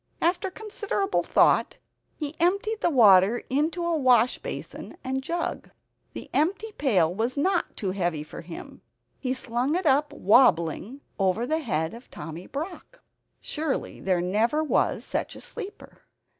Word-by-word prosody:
After 355 +3 +1
considerable 410 0 -2
thought, - - +3 0.4
he 295 -1 -4
emptied 400 +6 +1
the - - +3
water 215 - +6
into 320 +5 0
a 340 -1 +1
wash 255 -4 +4
basin - - -7
and 265 0 -2
jug. 335 +5 -3 0.4
The - - -7
empty 390 +8 0
pail 195 - +2
was 230 +7 -2
not 360 +4 0
too 195 -4 -2
heavy 175 -5 -1
for 150 - -9
him; 165 0 -10 0.4
he 255 0 -1
slung 255 +4 -1
it 365 0 -1
up 290 +1 +3
wobbling 215 - +3 0.2
over 195 +4 +1
the 315 +5 0
head 160 - -1
of 235 +2 -12
Tommy 165 +3 -8
Brock. 350 - -7 0.4
Surely 305 -2 -3
there 185 -2 +1
never 220 - +1
was 305 - +1
such - - -2
a - - -10
sleeper! 410 -4 -9
265 Hz, 145 wpm, -26 LUFS, 200-340 Hz, 0.4 s, water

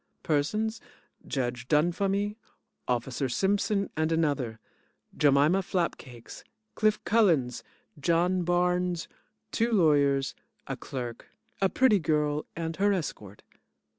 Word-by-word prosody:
PERSONS: 215 +9 0 0.5
Judge 125 -2 -3
Dunfumy, 195 +7 +1 0.5
Officer 125 +2 -1
Simpson 200 - +1
and 155 +1 0
another, 145 -9 0 0.6
Jemima 145 +6 +4
Flapcakes, 160 -10 -4 0.3
Cliff 215 -1 +2
Mullins, 160 - +3 0.4
John 175 +5 +2
Barnes, 180 0 0 0.4
two 230 +1 +1
lawyers, 145 -8 +3 0.3
a - - -4
clerk, 120 -3 -6 0.3
a 195 - +4
pretty 235 -4 +4
girl 150 -2 0
and 165 -1 -4
her 205 +1 +3
escort. 105 - -4
165 Hz, 100 wpm, -28 LUFS, 140-195 Hz, 0.6 s, Jemima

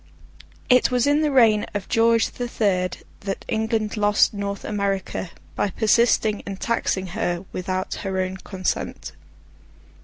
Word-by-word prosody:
It 250 0 +5
was 250 -2 +2
in 290 +1 +3
the 305 - +2
reign 225 -6 +4
of 200 -2 -3
George 230 -1 +3
the 245 - -4
Third 185 -6 -1 0.2
that 195 -1 -5
England 220 -1 -1
lost 205 0 +3
North 200 -1 -4
America, 195 -3 -2 0.3
by 205 - 0
persisting 220 0 +2
in 195 -1 -7
taxing 195 -3 -1
her 175 -4 -2
without 185 +1 -3
her 190 -1 -2
own 185 0 -2
consent. 190 0 -4
205 Hz, 135 wpm, -23 LUFS, 190-230 Hz, 0.3 s, It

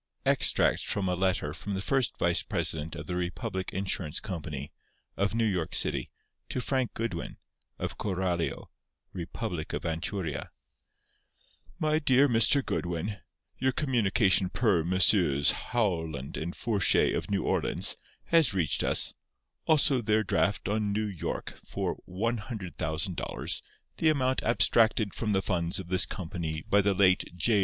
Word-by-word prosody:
_Extracts - - +3
from 100 -2 -2
a 90 - +1
letter 90 -5 0
from 100 +4 -5
the - - -2
first 130 +5 0
vice - - +2
president 80 +1 -1
of 75 0 -7
the 90 - -4
Republic 90 +1 -3
Insurance 95 -5 -2
Company, 75 -7 -6 0.4
of 100 +2 0
New 115 0 +2
York 95 -7 -1
City, - - 0 0.4
to - - -2
Frank 130 0 -1
Goodwin, 110 -7 -4 0.4
of - - -5
Coralio, 90 -4 -2 0.4
Republic 90 -1 -5
of - - -3
Anchuria._ 80 0 -3 1.3
My 155 0 +1
Dear 140 -2 +4
Mr. 125 +3 +4
Goodwin:—Your 100 +8 -3
communication 110 -8 +2
per 105 -6 +2
Messrs. 85 -5 +4
Howland 80 - -2
and 85 +2 -4
Fourchet, 105 -6 +2
of - - -3
New 100 -1 0
Orleans, - - 0 0.3
has 160 - +3
reached 85 -6 +1
us. - - +3 0.5
Also 145 -5 +5
their 110 0 +2
draft 100 -2 0
on 105 0 0
N. 105 -3 -2
Y. - - -1 0.3
for - - -3
$100,000, 95 - -2 0.4
the 160 - +3
amount 130 -4 +1
abstracted 110 -2 +3
from 105 -3 -1
the 95 0 +1
funds 85 -2 0
of 95 -2 -6
this 90 0 +2
company 80 -4 -4
by 100 - +4
the 100 0 +1
late 95 -1 +4
J. 105 +5 +2
95 Hz, 135 wpm, -29 LUFS, 85-115 Hz, 1.3 s, Also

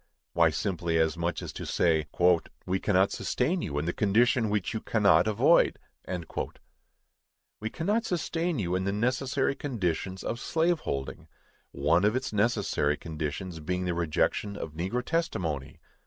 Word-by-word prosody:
Why, 85 -1 +5
simply, 85 -1 -1
as 80 0 +2
much 85 -1 -2
as - - -6
to - - -6
say, 80 -3 +1 0.6
"We 95 +1 0
cannot 95 -1 +3
sustain 165 +8 0
you 70 - -3
in 75 - -1
the 85 - -1
condition 110 +2 +3
which 105 +1 -1
you 110 - -2
cannot 105 -1 +4
avoid!" 105 -2 +4 1.8
We 110 - -3
cannot 210 - 0
sustain 170 -2 -1
you 90 -5 -1
in 95 +1 0
the 100 - +1
necessary 130 +5 0
conditions 95 - -3
of 115 - -3
slave 165 +4 +1
holding; 70 - -4 0.4
one 75 +6 +2
of 105 +3 +3
its 130 -2 -2
necessary 105 -9 +1
conditions 80 +2 -5
being 90 +4 -2
the 90 - 0
rejection 85 +4 0
of 80 - -6
negro 95 +10 -2
testimony! 85 - -2
95 Hz, 150 wpm, -28 LUFS, 85-125 Hz, 1.8 s, Why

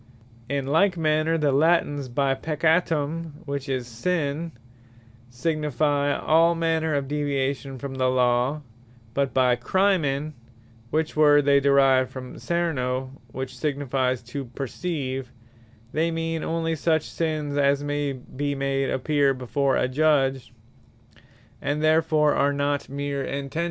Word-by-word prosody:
In 140 -1 -1
like 175 +6 +2
manner 155 0 +1
the 150 -3 +2
Latines 145 -2 +2
by 135 +2 +1
Peccatum, 160 +1 -1
which 140 -1 -4
is 130 -2 -1
Sinne, 150 +5 -2 0.8
signifie 145 +1 0
all 165 +2 +4
manner 160 -2 0
of 140 -1 -1
deviation 140 -2 -2
from 140 +1 -6
the 130 -1 0
Law; 125 +3 +1 0.5
but 140 +1 0
by 125 0 +3
crimen, 155 -4 +1 0.6
(which 155 +2 -1
word 145 -2 +5
they 140 0 +5
derive 135 -2 +4
from 130 -1 -9
Cerno, 130 -7 -1 0.2
which 130 +1 -6
signifies 130 -3 -1
to 135 +3 -6
perceive,) 135 0 -4 0.6
they 160 +2 +1
mean 165 0 -2
onely 165 0 -1
such 160 0 +1
sinnes, 155 -3 -3
as 140 0 +2
my 145 -2 -2 0.2
be 145 +1 -1
made 135 -1 -1
appear 140 0 +1
before 130 +2 0
a - - +1
Judge; 135 -2 +1 1.1
and 145 +2 -1
therfore 155 -1 +3
are 145 0 +2
not 145 0 -1
meer 140 0 -3
Intentions. 140 +3 -4
145 Hz, 125 wpm, -25 LUFS, 135-155 Hz, 1.1 s, word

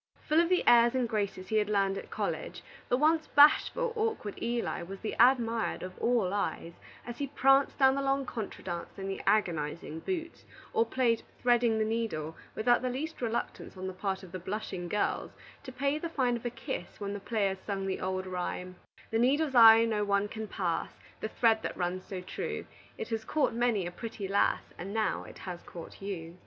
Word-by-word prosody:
Full 310 +2 +4
of 340 - 0
the 365 -1 +2
airs 235 +1 +6
and 255 -2 +1
graces 200 -4 -2
he 220 - +2
had 210 -1 +1
learned 195 -2 +2
at - - -7
college, - - -4 0.3
the 245 - +3
once 315 +3 +3
bashful, 460 +11 +5
awkward 435 - -1
Eli 235 -5 -1
was 190 +3 -7
the 220 - -3
admired 235 -2 +3
of 185 0 -7
all 230 -6 +1
eyes, 185 -4 -2 0.3
as 240 0 -7
he 285 - -1
pranced 270 0 +3
down 265 -1 +5
the 275 - -1
long 275 0 +1
contra 225 -5 -6
dance 175 -2 -5
in 195 0 -5
the 195 - -4
agonizing 160 -5 0
boots, 340 - -4 0.3
or 455 0 +3
played 235 -3 +1 0.2
"threading 240 -2 +3
the 215 - +1
needle" 215 -9 -2 0.2
without 240 +2 +3
the 255 - -1
least 295 +5 -4
reluctance 230 -4 -3
on 185 - -5
the 190 - -4
part 190 +1 -3
of 185 - -11
the 185 - -5
blushing 185 -1 -4
girls 210 - 0 0.3
to 265 - -9
pay 280 +4 0
the 335 - -4
fine 255 -6 +1
of 235 +1 -4
a - - 0
kiss 265 +3 -6
when 200 -1 -3
the 205 - -4
players 200 -2 -1
sung 195 -1 -3
the 190 -1 -2
old 185 0 -2
rhyme: 180 0 -4 0.3
"The 225 - +1
needle's 275 +4 +2
eye 225 -2 +9
no 215 -2 0
one 200 0 +1
can 220 0 -5
pass; 175 -5 -2 0.3
The 220 - -3
thread 225 -1 +3
that - - -4
runs 180 +1 -2
so 185 -2 -5
true 180 - -4 0.3
It - - -5
has 225 -1 -2
caught 285 +1 +1
many 230 -5 +1
a 175 - -4
pretty 220 0 -6
lass, 200 +1 +2 0.2
And 195 +4 -5
now 220 -1 0
it - - -12
has 180 -2 -7
caught 170 +2 -11
you." 180 -3 -6
220 Hz, 205 wpm, -30 LUFS, 190-250 Hz, 0.3 s, eye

